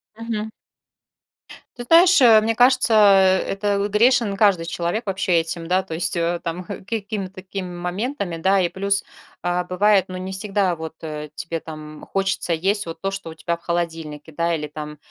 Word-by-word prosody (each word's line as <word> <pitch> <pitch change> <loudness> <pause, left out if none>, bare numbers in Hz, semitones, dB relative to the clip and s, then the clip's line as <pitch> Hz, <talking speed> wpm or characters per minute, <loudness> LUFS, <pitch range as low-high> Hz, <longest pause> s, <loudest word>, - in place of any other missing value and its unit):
Мгм. 220 -1 -4 1.3
Ты 245 - -5
знаешь, 340 +6 +6
э, 225 -3 +7
мне 225 +1 0
кажется, 250 -1 +4
э, 195 -3 +6
это, 200 0 0
грешен 225 0 +3
каждый 195 -5 +3
человек 175 +6 -2
вообще 190 -2 -1
этим, 165 0 -5
да, 185 +2 +2
то 165 - -8
есть, 170 +3 0
э, 170 +1 0
там, 175 +2 -4
э, 200 -2 -7
какими-то 200 -3 -4
такими 185 0 -6
моментами, 180 +2 -4
да. 190 +4 +2
И 175 - +1
плюс, 200 +1 0 0.4
а, 175 0 0
бывает, 190 +2 +3
ну, 185 - -6
не 185 +1 -5
всегда 195 -2 0
вот, 160 -1 -7
э, 150 -1 -6
тебе 165 -1 -4
там, 155 -1 -9
м, - - -12
хочется 195 -2 -1
есть 195 +4 0
вот 165 0 -7
то, 195 0 -1
что 195 -4 -6
у 160 - -10
тебя 170 +1 -3
в - - -29
холодильнике, 165 -3 -4
да, 170 +2 0
или 150 - -4
там 150 0 -8
190 Hz, 185 wpm, -22 LUFS, 170-205 Hz, 1.3 s, э